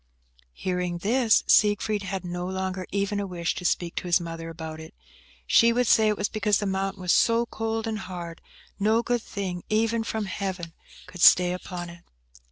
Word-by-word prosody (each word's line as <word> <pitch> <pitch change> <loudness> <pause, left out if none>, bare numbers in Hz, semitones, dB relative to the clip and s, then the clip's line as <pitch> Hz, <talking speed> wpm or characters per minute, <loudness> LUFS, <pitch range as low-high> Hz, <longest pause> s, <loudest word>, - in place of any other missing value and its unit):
Hearing 180 -1 -2
this, 225 +5 +3
Siegfried 210 0 +3
had 190 -1 -4
no 175 0 -4
longer 190 -1 -3
even 200 +1 -1
a 200 - -3
wish 175 -2 -2
to - - -7
speak 175 -1 0
to - - -3
his 175 +1 +4
mother 165 -1 -6
about 160 -1 -7
it. 160 0 -11 0.5
She 235 0 +5
would 245 +1 +1
say 220 -1 +4
it 210 -1 +1
was 205 - 0
because 210 -1 +1
the 205 - -3
mountain 195 -1 -2
was 180 - +1
so 230 +1 +3
cold 225 -1 -3
and 220 -1 -3
hard, 175 -4 -7 0.4
no 220 +3 +2
good 240 0 0
thing, 185 -5 -5
even 225 +1 +1
from 220 -1 -3
Heaven, 185 -3 -4 0.3
could 180 - -10
stay 180 0 +7
upon 180 -1 -6
it! 170 0 -15
190 Hz, 185 wpm, -26 LUFS, 175-215 Hz, 0.5 s, stay